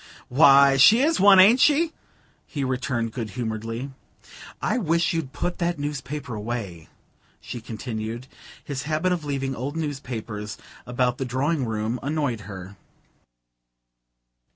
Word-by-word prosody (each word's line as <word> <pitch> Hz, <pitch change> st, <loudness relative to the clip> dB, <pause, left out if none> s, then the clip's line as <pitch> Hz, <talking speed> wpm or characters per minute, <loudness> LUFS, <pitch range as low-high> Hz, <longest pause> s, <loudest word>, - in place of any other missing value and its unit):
'" -, -, -21 dB
"Why, 140 Hz, 0 st, +6 dB
she 215 Hz, -, +7 dB
is 320 Hz, +2 st, +2 dB
one, 195 Hz, -1 st, +7 dB
ain't 215 Hz, +7 st, +7 dB
she?" 310 Hz, +4 st, +3 dB, 0.5 s
he 145 Hz, -3 st, -4 dB
returned 125 Hz, -3 st, -2 dB
good 115 Hz, -1 st, -5 dB
humouredly. 115 Hz, +3 st, -4 dB, 0.7 s
"I -, -, 0 dB
wish 170 Hz, -4 st, +1 dB
you'd 160 Hz, -5 st, -3 dB
put 180 Hz, -, -3 dB
that 170 Hz, 0 st, 0 dB
newspaper 145 Hz, -2 st, -5 dB
away," 105 Hz, -7 st, -5 dB, 0.5 s
she 120 Hz, -, -7 dB
continued; 115 Hz, +1 st, -5 dB, 0.4 s
his 140 Hz, -2 st, -4 dB
habit 155 Hz, +4 st, +1 dB
of 170 Hz, -4 st, -2 dB
leaving 135 Hz, -2 st, -2 dB
old 140 Hz, +6 st, -4 dB
newspapers 120 Hz, -8 st, -5 dB, 0.3 s
about 125 Hz, 0 st, 0 dB
the 135 Hz, -, -1 dB
drawing 135 Hz, +3 st, 0 dB
room 110 Hz, +2 st, -2 dB
annoyed 140 Hz, -8 st, -2 dB
her. 95 Hz, 0 st, -9 dB
135 Hz, 130 wpm, -24 LUFS, 115-155 Hz, 0.7 s, she